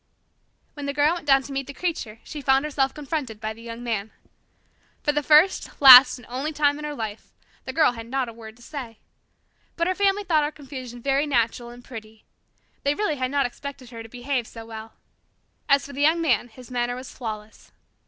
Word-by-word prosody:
When 290 -1 -6
the 280 - -3
Girl 295 +3 +3
went 345 -4 -7
down 270 -1 +5
to 280 - -9
meet 275 -1 -3
the 280 - -9
Creature 255 -11 -4
she 300 - -8
found 270 +1 +3
herself 275 -3 0
confronted 285 -7 -4
by 220 0 -4
the 225 - -15
Young 230 +1 -8
Man. 220 -3 -2 0.9
For 295 - +2
the 295 0 0
first, 310 +6 +3
last, 260 -2 +10
and 245 - -14
only 265 +5 -3
time 290 -1 +1
in 300 - -6
her 295 -1 -4
life, 220 -3 -6 0.3
the - - -4
Girl 310 -5 +4
had 230 -1 -9
not 260 +1 -1
a 230 - -8
word 220 -1 -11
to 240 - -17
say. 250 -6 -7 0.8
But 335 - 0
her 370 - +1
family 400 +1 +1
thought 315 -5 +2
her 295 - 0
confusion 255 -5 -9
very 275 +2 +1
natural 235 -2 0
and 240 0 -13
pretty. 220 -3 -11 0.6
They 285 +1 +1
really 320 -7 -1
had 255 -1 -1
not 280 0 +1
expected 255 0 -8
her 230 -1 -8
to 225 - -11
behave 245 0 -3
so 225 -1 -10
well. 220 0 -9 0.8
As 280 -2 +4
for 280 - -10
the 280 - -4
Young 315 +3 +4
Man, 255 -8 +1
his 245 +1 -15
manner 245 0 -1
was 255 +1 -9
flawless. 215 -3 -8
265 Hz, 210 wpm, -24 LUFS, 235-290 Hz, 0.9 s, last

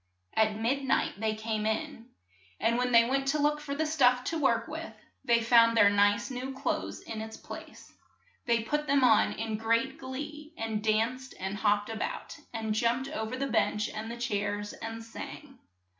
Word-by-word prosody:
At 215 -1 +2
mid 245 +6 0
night 265 -6 0
they 220 0 0
came 215 0 -2
in, 240 +1 -3 0.5
and 230 +1 +2
when 250 0 +1
they 230 -1 +6
went 270 +1 0
to 300 +2 +1
look 295 +1 +2
for 280 -1 -4
the 315 +2 0
stuff 250 -5 +3
to 325 +5 -2
work 280 - +2
with, - - -6 0.3
they 235 -1 +3
found 230 0 +5
their 205 -2 +7
nice 205 +4 +3
new 260 +1 -5
clothes 270 - -2
in 220 -1 -6
its 220 0 -7
place. - - -11 0.5
They 235 -1 +2
put 295 +6 -1
them 280 -1 +3
on 225 -4 +5
in 220 -1 -3
great 230 +4 0
glee, 295 +4 -7
and 220 -2 -2
danced 230 +4 0
and 190 +1 -3
hopped 205 +1 +1
a - - -4
bout, - - -5
and 220 -2 -2
jumped 235 +5 +1
o 280 -7 -3
ver 220 - -4
the 275 - -1
bench 215 -4 +1
and 215 +1 -6
the 235 - -6
chairs, 205 -3 -2
and 225 0 -6
sang. 265 +4 -9
230 Hz, 190 wpm, -30 LUFS, 220-270 Hz, 0.5 s, their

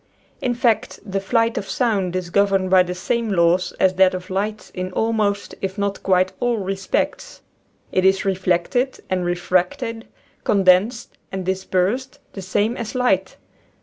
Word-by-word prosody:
In 245 -1 0
fact, 235 -2 +1
the 195 -1 -2
flight 230 +4 +1
of 195 - -8
sound 200 -8 0
is 180 -2 -3
governed 195 -1 +2
by 185 -1 +7
the 180 0 -2
same 230 +5 -1
laws 175 0 +2
as 190 -1 +4
that 190 -1 +5
of 185 +1 -7
light 210 +3 -3
in 185 0 -4
almost, 210 -2 0
if 190 +1 -3
not 200 0 -2
quite, 185 -1 +2
all 245 -2 +1
respects. 195 -1 -2 0.5
It 185 - +1
is 190 +1 +3
reflected 190 +7 0
and 185 -1 +1
refracted, 185 +7 -1 0.4
condensed 200 +4 +2
and 190 -1 -4
dis 190 +1 -2
persed, 225 +9 0 0.2
the 195 - -6
same 205 +5 0
as 235 -1 -5
light. 195 -7 +1
195 Hz, 155 wpm, -21 LUFS, 185-225 Hz, 0.5 s, by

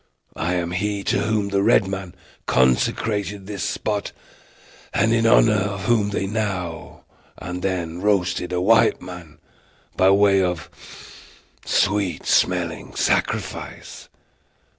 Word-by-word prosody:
I 85 +3 -1
am 85 -1 -2
he 100 +2 -2
to - - +1
whom 105 -1 0
the 100 0 +1
red 95 - +4
men 95 -2 -6 0.3
consecrated 100 - +1
this 100 -1 -6
spot, 105 -1 -2 0.8
and 115 +1 +3
in 115 -1 +2
honor 115 -1 +5
of 100 -1 -2
whom 105 -1 +2
they 100 -1 -2
now 95 -6 -4 0.3
and 90 +1 -6
then 90 -3 -3
roasted 95 -3 0
a 90 - 0
white 110 +5 +4
man, 90 -4 -10 0.6
by 95 - +4
way 100 0 +4
of 90 -2 -2 0.9
sweet 100 -2 0
smelling - - 0
sacrifice. - - -2
95 Hz, 120 wpm, -22 LUFS, 90-105 Hz, 0.9 s, honor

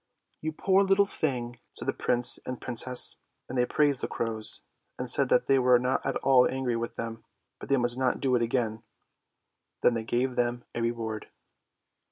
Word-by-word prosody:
" - - -47
You 155 - -2
poor 190 +5 +2
little 195 +1 +3
thing! 125 -10 -3
" - - -47
said - - -1
the - - +1
Prince 120 0 +2
and 125 -1 -6
Princess. 125 +1 +3 0.3
And 130 - -7
they 125 -1 +2
praised 145 -3 +2
the - - -2
crows, 110 -2 -2 0.3
and 125 - -4
said 130 +2 +2
that - - +3
they 135 -1 +3
were 125 -1 +5
not 125 +2 -1
at - - -2
all 130 -2 +5
angry 130 -2 -2
with 115 0 -4
them, 115 0 -6 0.4
but - - -10
they 140 - +3
must 120 0 +3
not 130 -1 0
do 130 -2 0
it 120 - +1
again. 115 -2 -1 1.0
Then 125 - +5
they 115 -1 -3
gave 125 +3 -1
them 120 0 -1
a 120 - -3
reward. 115 -2 -3
125 Hz, 200 wpm, -27 LUFS, 120-130 Hz, 1.0 s, were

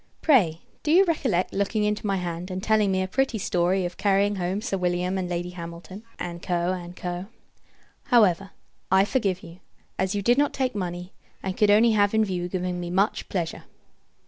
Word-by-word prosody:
Pray, 185 - +4 0.2
do - - -3
you 375 +4 +6
recollect 260 - 0
looking 200 +2 0
into 210 0 -1
my 195 - +1
hand, 175 0 -4
and 185 0 -4
telling 215 -2 +3
me 190 0 +1
a - - -3
pretty 265 +3 0
story 180 -1 +1
of 175 0 -5
carrying 200 0 +2
home 185 +2 -1
Sir 215 -2 -2
William 180 0 0
and 185 -2 -2
Lady 175 0 -3
Hamilton, 170 +3 -9 0.2
&c. 170 -1 -5
&c. 175 0 -2 0.8
However, 195 -7 +3 0.4
I 190 +1 +5
forgive 200 -6 -1
you; 170 +2 -12 0.4
as 190 +2 0
you 200 - -1
did 240 +6 +4
not 290 - +2
take 260 -2 -1
money, 180 -2 -5 0.3
and 190 -1 -3
could 210 0 +3
only 220 +3 +6
have 205 0 +3
in 220 0 +4
view 180 -3 -3
giving 180 -1 -2
me 175 -1 -4
much 195 +4 0
pleasure. 170 -4 -3
190 Hz, 185 wpm, -25 LUFS, 175-210 Hz, 0.8 s, you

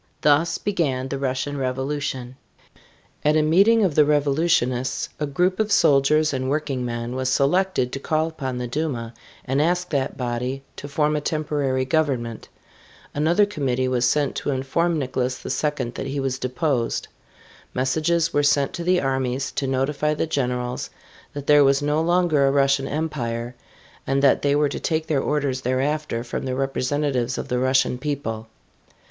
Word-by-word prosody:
Thus 150 +3 +3
began 135 -10 -1
the 140 - -3
Russian 135 +2 -2
Revolution. 130 -1 -3 0.9
At 150 +1 +3
a 155 - +3
meeting 200 +8 +4
of 185 -6 +2
the 150 - +5
revolutionists 145 -3 +1
a 150 - -1
group 180 +7 0
of 215 -1 0
soldiers 150 +1 +4
and 130 0 -2
working 140 -3 -1
men 120 0 -4
was 130 0 -1
selected 140 -1 +1
to 135 - -4
call 155 +3 0
upon 135 -6 -4
the 125 - -3
Duma 125 -4 -3 0.3
and 135 +3 +1
ask 180 +3 0
that 135 -3 -1
body 125 +1 -3
to 145 - -7
form 150 +1 +1
a 150 - -1
temporary 145 -4 -1
government. 130 -7 -1 0.6
Another 170 +7 +3
committee 130 -9 -1
was 125 -1 0
sent 145 0 +1
to - - -3
inform 145 +6 0
Nicholas 130 -2 -2
II 150 -5 -1
that 135 - -5
he 140 +1 -3
was 135 -1 -2
deposed. 130 -2 -1 0.7
Messages 160 +6 +1
were 145 - +3
sent 145 -1 +2
to 170 - -4
the 180 +1 +3
armies 135 -1 -1
to 135 - -2
notify 140 +3 0
the - - 0
generals 125 -4 -2 0.4
that 145 -1 -6
there 145 0 +6
was 140 +1 +3
no 150 +2 +1
longer 170 -4 +3
a - - +3
Russian 135 -1 +2
Empire 125 -7 -3 0.5
and 135 +1 +1
that 140 - +4
they 140 0 +2
were 145 0 +2
to - - -4
take 160 -1 -1
their 145 -4 0
orders 140 -3 -1
thereafter 130 0 -1
from 120 - -4
the 130 -1 -2
representatives 135 -1 -1
of - - -5
the 125 - 0
Russian 130 -1 +2
people. 130 -7 -4
140 Hz, 165 wpm, -23 LUFS, 130-150 Hz, 0.9 s, there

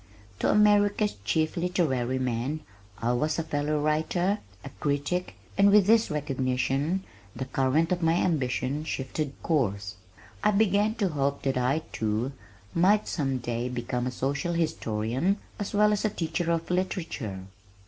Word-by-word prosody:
To - - +1
America's 210 0 +4
chief 155 - +1
literary 155 -9 0
man 130 +4 -2 0.4
I 120 +2 0
was 150 +5 0
a 165 - 0
fellow 150 0 -1
writer, 160 +6 +1 0.3
a - - -5
critic, 145 +5 -1 0.2
and 200 +1 +7
with 205 -1 +6
this 225 +2 +4
recognition 140 +4 0 0.3
the 130 - -3
current 135 +6 +1
of 180 -1 +1
my 165 0 +3
ambition 140 -3 0
shifted 140 0 -3
course. 100 - 0 0.5
I - - +5
began 210 +1 +3
to 200 -5 0
hope 140 -2 -1
that 135 -1 0
I, 135 +6 +1
too, 110 +4 -1 0.4
might 200 +5 +3
some 135 -5 -1
day 120 0 -3
become 125 0 -2
a - - -2
social 140 +7 -1
historian 135 - 0 0.2
as 205 - -3
well 210 +1 +4
as 205 - -1
a 215 - +2
teacher 170 -2 -2
of 165 +1 -1
literature. 165 - -2
150 Hz, 150 wpm, -27 LUFS, 130-180 Hz, 0.5 s, and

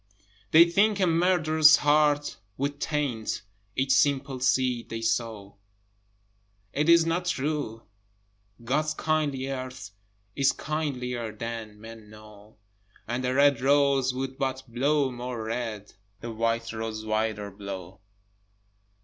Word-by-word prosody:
They 165 +2 +8
think 200 +4 +2
a 190 - +3
murderer's 165 -3 +5
heart 145 0 +2 0.2
would 140 +1 -2
taint 140 -11 -2 0.3
Each 135 0 0
simple 135 -1 +2
seed 125 -2 +1
they 115 0 -5
sow. 110 -3 -2 1.2
It 150 +3 +1
is 170 -1 +6
not 175 +2 -1
true! 145 -7 -2 0.8
God's 150 +6 0
kindly 150 -4 -1
earth 130 -5 -6 0.4
Is 140 -1 +3
kindlier 125 -7 -3
than 110 -1 -7
men 110 -1 -12
know, 105 0 -15 0.5
And 120 +3 -2
the 125 +1 0
red 140 -3 +4
rose 140 -1 +3
would 130 +1 -5
but 130 -1 -2
blow 135 +3 +1
more 120 -2 -5
red, 110 -2 -4 0.3
The 120 - -6
white 115 +1 -1
rose 110 -1 -5
whiter 110 -1 -1
blow. 95 -2 -8
130 Hz, 120 wpm, -27 LUFS, 115-145 Hz, 1.2 s, They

